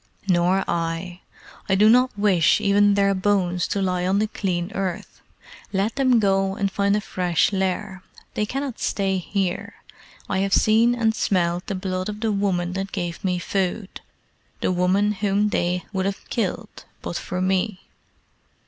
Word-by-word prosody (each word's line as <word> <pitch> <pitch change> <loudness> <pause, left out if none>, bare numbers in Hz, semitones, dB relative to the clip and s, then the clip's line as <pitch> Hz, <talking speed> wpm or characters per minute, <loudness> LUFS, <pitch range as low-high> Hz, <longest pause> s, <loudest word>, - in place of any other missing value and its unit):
"Nor 180 +1 +2
I. 170 +2 -3 0.5
I 190 - +4
do 210 +2 +5
not 250 0 +4
wish 195 -5 +3
even 205 0 +3
their 200 0 +3
bones 185 -2 0
to 200 - -1
lie 180 -1 0
on 190 +2 +2
the 210 - +2
clean 185 -3 -3
earth. 190 -3 -4 0.5
Let 200 +3 0
them 260 -3 +3
go 195 -2 +1
and 200 -2 -1
find 200 0 +1
a 210 - 0
fresh 180 0 0
lair. 190 0 -2 0.3
They 210 - -1
cannot 270 0 -4
stay 195 -2 0
here. 190 0 -3 0.5
I 190 - -1
have 195 0 0
seen 230 +3 +4
and 225 -2 +1
smelled 175 -4 0
the 195 - -2
blood 185 0 -3
of 210 0 -6
the 225 -1 +1
woman 185 -3 0
that 195 +1 -4
gave 175 -3 -4
me 180 -2 0
food 190 +2 -3 0.6
the - - 0
woman 185 +3 +2
whom 205 0 0
they 180 -2 -1
would 190 0 0
have 200 - -5
killed 225 0 -3 0.2
but - - -5
for 180 - -4
me. 185 +1 0
195 Hz, 165 wpm, -23 LUFS, 180-205 Hz, 0.6 s, do